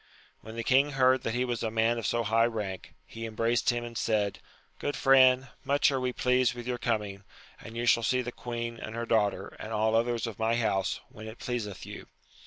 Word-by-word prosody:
When 110 Hz, +1 st, -10 dB
the 115 Hz, -, -3 dB
king 135 Hz, +4 st, +3 dB
heard 130 Hz, -1 st, +4 dB
that 115 Hz, -1 st, -2 dB
he 125 Hz, +1 st, +1 dB
was 120 Hz, -2 st, -2 dB
a 115 Hz, -, -1 dB
man 115 Hz, +1 st, +1 dB
of 110 Hz, -, -2 dB
so 120 Hz, 0 st, 0 dB
high 115 Hz, +2 st, +3 dB
rank, 105 Hz, -5 st, -5 dB
he 115 Hz, 0 st, -7 dB
embraced 115 Hz, +1 st, +1 dB
him 120 Hz, -1 st, 0 dB
and 120 Hz, 0 st, -8 dB
said, 105 Hz, -3 st, 0 dB, 0.4 s
Good 145 Hz, -, -2 dB
friend, 130 Hz, -1 st, +5 dB
much 140 Hz, +1 st, +3 dB
are 135 Hz, -, 0 dB
we 125 Hz, 0 st, -1 dB
pleased 125 Hz, 0 st, +2 dB
with 120 Hz, -1 st, -7 dB
your 125 Hz, -1 st, -3 dB
coming, 105 Hz, -4 st, -2 dB, 0.4 s
and 115 Hz, +1 st, -10 dB
you 120 Hz, -, -1 dB
shall 115 Hz, -, +4 dB
see 125 Hz, +3 st, +1 dB
the 120 Hz, -, -5 dB
queen 120 Hz, -1 st, -5 dB
and 110 Hz, +1 st, -7 dB
her 115 Hz, 0 st, -3 dB
daughter 105 Hz, -4 st, 0 dB
and 110 Hz, -, -7 dB
all 110 Hz, 0 st, +1 dB
others 115 Hz, +1 st, +1 dB
of 115 Hz, -3 st, -7 dB
my 110 Hz, +1 st, +2 dB
house, 100 Hz, -5 st, 0 dB
when 110 Hz, +1 st, -10 dB
it 110 Hz, -, -9 dB
pleaseth 115 Hz, -6 st, -4 dB
you. -, -, -9 dB
115 Hz, 220 wpm, -29 LUFS, 110-125 Hz, 0.4 s, friend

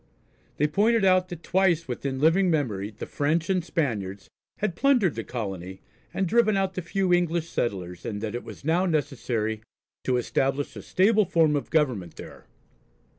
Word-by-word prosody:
They 150 Hz, -, +2 dB
pointed 210 Hz, +7 st, +2 dB
out 185 Hz, -1 st, +4 dB
that 170 Hz, -3 st, -8 dB
twice 175 Hz, -4 st, +2 dB
within 130 Hz, +1 st, -3 dB
living 170 Hz, +6 st, +4 dB
memory 110 Hz, -, -1 dB
the 110 Hz, -, -8 dB
French 160 Hz, +5 st, 0 dB
and 185 Hz, -2 st, +1 dB
Spaniards 105 Hz, -, -3 dB, 0.3 s
had 205 Hz, -5 st, -2 dB
plundered 245 Hz, -, +3 dB
the 115 Hz, -, -4 dB
colony, 95 Hz, -6 st, -5 dB, 0.3 s
and 195 Hz, -, -1 dB
driven 215 Hz, +1 st, +3 dB
out 190 Hz, -1 st, 0 dB
the 185 Hz, -, -3 dB
few 185 Hz, +1 st, 0 dB
English 170 Hz, -2 st, +1 dB
settlers, 90 Hz, -6 st, -3 dB
and 105 Hz, -2 st, -4 dB
that 110 Hz, -2 st, -3 dB
it 120 Hz, -, -4 dB
was -, -, -11 dB
now 175 Hz, +4 st, +2 dB
necessary 120 Hz, -8 st, -1 dB, 0.4 s
to 125 Hz, -1 st, +2 dB
establish 135 Hz, +2 st, -1 dB
a 105 Hz, -, -7 dB
stable 210 Hz, -, +3 dB
form 160 Hz, -3 st, +3 dB
of 145 Hz, -, -3 dB
government 125 Hz, -, 0 dB
there. -, -, -11 dB
155 Hz, 170 wpm, -26 LUFS, 115-185 Hz, 0.4 s, out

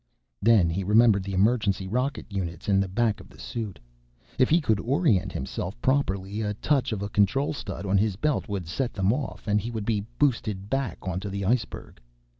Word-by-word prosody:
_ -, -, -47 dB, 0.4 s
Then 110 Hz, -5 st, +5 dB
he 95 Hz, +4 st, -2 dB
remembered 105 Hz, +1 st, +5 dB
the 100 Hz, 0 st, -4 dB
emergency 100 Hz, -2 st, +2 dB
rocket 125 Hz, +7 st, -1 dB
units 95 Hz, -2 st, -5 dB
in 100 Hz, -1 st, +4 dB
the 100 Hz, -, +1 dB
back 105 Hz, +2 st, 0 dB
of -, -, -13 dB
the -, -, -17 dB
suit. 110 Hz, -5 st, -5 dB, 0.6 s
If 130 Hz, -, +5 dB
he 165 Hz, -, +5 dB
could 110 Hz, -, +1 dB
orient 115 Hz, -, +2 dB
himself 90 Hz, -, -4 dB
properly, 105 Hz, -7 st, 0 dB
a 105 Hz, -1 st, -2 dB
touch 135 Hz, +2 st, +1 dB
of 105 Hz, -2 st, -2 dB
a 100 Hz, -, -3 dB
control 105 Hz, +10 st, +2 dB
stud 120 Hz, -5 st, -6 dB
on 100 Hz, 0 st, +3 dB
his 105 Hz, -2 st, +1 dB
belt 145 Hz, +2 st, -1 dB
would 95 Hz, -5 st, -3 dB
set 120 Hz, +9 st, -2 dB
them 95 Hz, +1 st, +2 dB
off, 135 Hz, -3 st, -5 dB
and 105 Hz, 0 st, +2 dB
he 115 Hz, -, -4 dB
would 110 Hz, -3 st, -4 dB
be 105 Hz, -2 st, -1 dB
boosted 105 Hz, -8 st, 0 dB
back 135 Hz, -10 st, -1 dB
onto 95 Hz, +2 st, -3 dB
the 100 Hz, 0 st, -3 dB
iceberg. 110 Hz, +1 st, -2 dB
105 Hz, 205 wpm, -26 LUFS, 95-120 Hz, 0.6 s, Then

